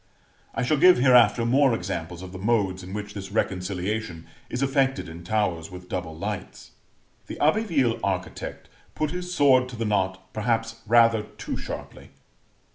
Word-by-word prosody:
I 135 - 0
shall 150 +5 +2
give, 180 +5 +7
hereafter, 125 -3 +5
more 130 +1 +4
examples 85 -3 -5
of 90 - -8
the 95 - -8
modes 100 -3 +1
in 90 +1 -9
which 105 0 -5
this 100 -1 -7
reconciliation 95 -2 -2 0.2
is 125 +2 -2
effected 135 0 +1
in 85 +1 -9
towers 90 -4 -1
with 90 0 -11
double 85 -4 -4
lights: 100 0 -6 0.6
the - - -7
Abbeville 155 - +2
architect 95 -2 -4 0.3
put 155 -1 -1
his 180 0 -5
sword 130 -6 +4
to 125 - -8
the 115 0 -3
knot 95 -2 -1
perhaps 115 0 -1
rather 115 -1 +5
too 105 - -7
sharply. - - -8
110 Hz, 155 wpm, -25 LUFS, 95-125 Hz, 0.6 s, give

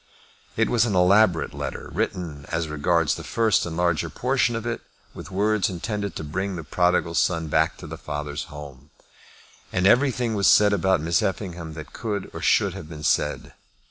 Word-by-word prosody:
It - - +3
was 115 -2 +3
an 105 - -1
elaborate 90 -1 +4
letter, - - -6
written, 75 -6 -3
as 85 -1 -1
regards 80 +1 +1
the - - -6
first 110 -5 +1
and 80 -1 -5
larger 85 -2 +1
portion 125 -2 0
of 115 0 -4
it, 120 -1 -3 0.3
with - - -9
words 105 +2 +1
intended 100 +2 -4
to - - -5
bring 95 +6 -3
the 80 - -5
prodigal 90 +2 +1
son 85 -1 +1
back - - +2
to - - -10
the - - -8
father's 75 -1 -4
home. 70 -2 -11 0.8
And 95 0 0
everything 125 +1 +3
was 100 -2 +2
said 105 -1 +6
about 95 -3 +2
Miss 85 +1 +1
Effingham 90 -4 -3
that 80 -1 -9
could 105 -4 -4
or - - -6
should - - +3
have 75 - -9
been 75 -2 -9
said. 75 -1 0
90 Hz, 180 wpm, -24 LUFS, 80-105 Hz, 0.8 s, said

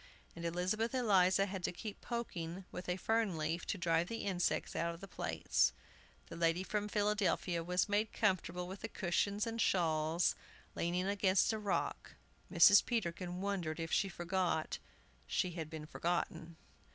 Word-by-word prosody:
And 170 - -7
Elizabeth 185 +8 0
Eliza 195 -5 +4
had 190 -2 -5
to - - 0
keep 205 +3 -7
poking 190 -7 -4
with 180 - -6
a 180 - 0
fern 220 -3 +1
leaf 160 +2 -2
to - - -1
drive 170 -1 +1
the 230 +2 -4
insects 185 -3 0
out 170 0 -1
of - - -13
the 195 - -9
plates. 80 - +1 0.5
The - - -9
lady 165 +2 +1
from 210 +2 -2
Philadelphia 205 -5 +1
was 180 +1 +1
made 205 +1 +1
comfortable 180 -3 0
with 190 +2 -7
the 225 - -4
cushions 200 +2 0
and 230 0 -2
shawls, 165 -2 +2 0.4
leaning 175 +2 -1
against 200 0 +3
a 220 - -2
rock. 205 -2 -2 0.4
Mrs. 205 0 +8
Peterkin 180 -5 -2
wondered 180 -6 -2
if 165 0 -4
she 195 - +2
forgot 175 -2 -1 0.5
she 180 - 0
had 165 -3 -5
been 155 -1 -7
forgotten. 170 0 -2
180 Hz, 160 wpm, -35 LUFS, 170-205 Hz, 0.5 s, Mrs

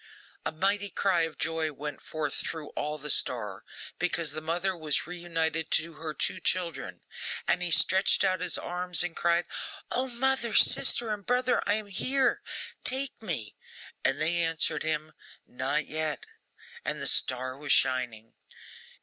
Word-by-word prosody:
A - - -1
mighty 200 +5 0
cry 185 -2 +1
of 155 - -19
joy 160 -1 -1
went 150 +1 -7
forth 155 -2 -3
through 160 -2 -4
all 150 +1 -3
the 150 0 0
star, 105 -6 0 0.4
because 170 -3 0
the 155 +1 -5
mother 175 +4 -1
was 155 -4 0
re 180 0 -7
united 160 -2 -1
to 165 +1 +1
her 155 0 -5
two - - -2
children. 170 -6 -2 0.5
And 180 - +3
he 180 - +4
stretched 190 +3 +5
out 185 -1 +2
his 180 -1 +1
arms 180 0 -1
and 175 -2 -4
cried, 170 0 +2 0.5
'O, 255 +2 0
mother, 245 -1 0
sister, 225 -3 +5
and 205 -1 -6
brother, 250 +3 +2
I 205 - +4
am 215 -1 -2
here! 260 +7 +1 0.4
Take 265 -1 +1
me!' 150 - -4 0.5
And 135 +2 +1
they 165 +3 +3
answered 165 -1 +1
him, 155 0 -2 0.3
'Not 130 +4 -1
yet,' 155 - -3 0.6
and - - -2
the - - -4
star 130 0 +2
was 145 +1 -3
shining. 120 -4 +1
165 Hz, 160 wpm, -29 LUFS, 150-190 Hz, 0.6 s, stretched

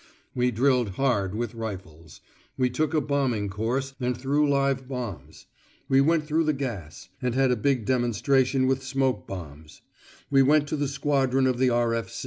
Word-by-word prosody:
We 125 0 +1
drilled 125 -3 +1
hard 100 -5 0
with 120 0 -3
rifles: 90 -8 -8 0.4
we 125 -1 +1
took 155 +4 -1
a 155 - +3
bombing 130 -8 -1
course 120 +7 -2
and 125 -1 -1
threw 145 +3 +1
live 135 -2 +1
bombs: 100 - -7 0.4
we 135 0 +4
went 155 +1 +2
through 160 +2 +1
the 155 - +2
gas, 105 - -6
and 125 -2 -1
had 135 -1 +3
a - - +3
big 125 0 0
demonstration 130 +2 +1
with 135 0 +1
smoke 130 0 -1
bombs: 80 -4 -9 0.5
we 135 -1 +5
went 145 +2 +4
to - - -1
a 145 0 0
squadron 135 -1 +1
of 130 -2 +1
the 130 -1 +4
R. 120 -1 +1
130 Hz, 170 wpm, -26 LUFS, 115-135 Hz, 0.5 s, we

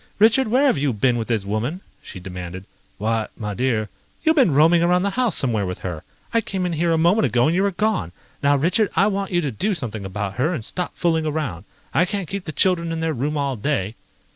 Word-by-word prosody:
"Richard, 225 +5 +5
where 255 +6 +3
have 260 - +3
you 140 -2 +1
been 120 +3 +2
with 115 - -3
this 110 -5 0
woman?" 115 - -2 0.2
she 95 - -9
demanded. 90 0 -7 0.3
"Why, 110 +1 -1
my 105 -2 -4
dear 110 -1 0 0.2
..." - - -36
"You've 320 -1 +4
been 225 - +4
roaming 165 +3 +5
around 180 +1 +3
the 200 - 0
house 240 - +1
somewhere 110 -7 +1
with 90 - -4
her. 85 -4 -4 0.3
I 230 - +3
came 195 -4 -3
in 175 - -1
here 165 +1 +1
a 165 - +3
moment 175 +7 +3
ago 120 0 +2
and 160 - +2
you 185 - +2
were 200 - +3
gone. 185 - -1 0.3
Now, 140 0 +4
Richard, 180 +9 +2
I 195 - +4
want 200 -1 -1
you 175 -2 +1
to 145 -4 -2
do 195 - -1
something 115 - -4
about 100 +1 -4
her 155 +8 +1
and 115 -7 -5
stop 180 -1 -4
fooling 160 -2 +1
around. 140 - -3 0.3
I 180 - +4
can't 195 -2 -3
keep 195 +1 -5
the 155 - -4
children 170 +1 +1
in 165 - -2
their 160 -1 0
room 145 +4 -2
all 140 -2 -1
day." 110 -4 -1
155 Hz, 240 wpm, -22 LUFS, 110-185 Hz, 0.3 s, Richard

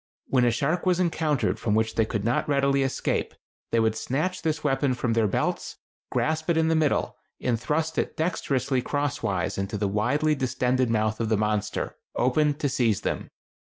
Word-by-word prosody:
When 125 -2 +2
a - - +5
shark 150 +10 0
was 180 -1 +3
encountered 160 -5 +1
from 105 -2 0
which 110 0 +1
they 110 - +2
could 110 -2 -3
not 120 +5 0
readily 140 -1 +2
escape, 135 -1 -1 0.3
they 115 - +2
would 110 -1 +2
snatch 155 +11 -2
this 155 -1 -1
weapon 135 -2 +1
from 120 -1 -1
their 115 -1 +3
belts, 95 - -2 0.3
grasp 155 +1 -1
it 170 - +3
in 160 0 +3
the 165 - +3
middle, 155 -2 +1 0.2
and 120 -3 0
thrust 160 +3 0
it - - -2
dexterously 135 -6 0
crosswise 120 -12 -1
into 100 +2 -2
the 100 0 0
widely 125 +10 +1
distended 130 -2 0
mouth 110 -1 0
of 115 -2 -1
the 110 - +2
monster, 105 0 -1 0.2
opened 145 +4 +2
to 145 - +2
seize 120 -7 +1
them. - - -3
130 Hz, 185 wpm, -26 LUFS, 110-150 Hz, 0.3 s, a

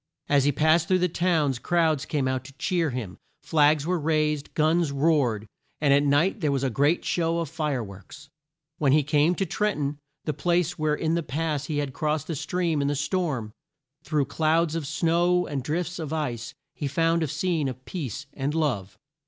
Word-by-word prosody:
As 140 -2 +3
he 145 - +4
passed 155 +3 +3
through 185 - +3
the 180 0 +2
towns, 160 -7 +1
crowds 160 -1 +1
came 145 -4 -1
out 130 -1 -1
to 140 - -11
cheer 175 -4 0
him, 120 -8 -5 0.2
flags 150 -1 +3
were 180 +1 0
raised, 150 -1 0
guns 160 0 +2
roared, 140 -7 +1 0.3
and 145 -2 +4
at 140 - +5
night 145 +8 +2
there 150 -3 +1
was 135 -1 0
a 135 - 0
great 145 +8 +2
show 165 -1 0
of 165 -3 -2
fire 150 -6 -1
works. 100 +9 -12 0.5
When 140 -3 +3
he 150 0 +4
came 150 +4 +2
to 195 - 0
Tren 210 +5 0
ton, 145 -1 -3 0.3
the 155 - -1
place 175 +2 0
where 155 -1 +1
in 160 +1 -1
the 170 - +1
past 150 0 -2
he 150 - -2
had 145 -2 -2
crossed 155 0 -1
the 165 - -4
stream 170 0 -1
in 140 - 0
the 145 - 0
storm, 145 - -1 0.5
through 150 -1 0
clouds 160 +3 +1
of 165 -4 -3
snow 175 +3 +2
and 140 -2 -3
drifts 170 +6 -3
of 155 -3 -5
ice, 125 -8 -3 0.2
he 145 - -4
found 165 +4 +1
a 160 - +1
scene 165 0 -1
of 130 0 -9
peace 145 - -5
and 140 +2 -2
love. 120 - -1
150 Hz, 200 wpm, -26 LUFS, 140-165 Hz, 0.5 s, at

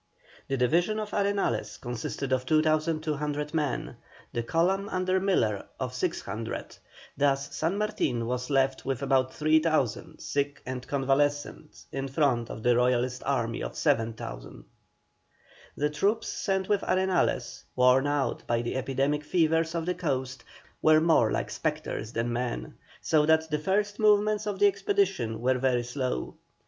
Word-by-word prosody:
The 135 - -1
division 175 - +2
of 215 -1 -5
Arenales 200 - -1
consisted 120 +2 -3
of 130 0 -1
2,200 155 -1 0
men, 150 -6 -2 0.4
the 120 - 0
column 185 - +1
under 185 0 +1
Miller 115 - +1
of - - -3
600, 110 +3 -4 0.4
thus 140 0 0
San 165 +5 0
Martin 210 - -1
was 125 +2 -3
left 135 -1 +1
with 135 0 -2
about 130 -1 +2
3,000 155 -5 +1
sick 140 0 -2
and 130 -1 -5
convalescent 145 +2 -1
in 135 0 -3
front 130 -5 +1
of 110 - -7
the 120 0 +4
Royalist 125 +1 +1
Army 115 -4 0
of - - -5
7,000. 115 - -2 1.1
The 150 +1 +1
troops 205 +9 0
sent 190 -2 -1
with 205 -1 +2
Arenales, 185 -1 0
worn 125 +2 +4
out 145 -4 0
by 120 0 +1
the 120 - -2
endemic 135 +3 0
fevers 160 +1 +1
of 165 -1 -1
the 180 - 0
coast, 130 -7 -3 0.4
were 155 0 +6
more 160 -9 +4
like - - -2
spectres 110 - -3
than 120 0 -1
men, 120 - -3 0.3
so 150 -2 +2
that 160 0 +3
the 150 - +1
first 205 +5 0
movements 210 0 +3
of 205 -2 -2
the 205 - +4
expedition 195 - +1
were 130 +1 +2
very 125 -2 +1
slow. 125 - -3
145 Hz, 145 wpm, -28 LUFS, 125-170 Hz, 1.1 s, were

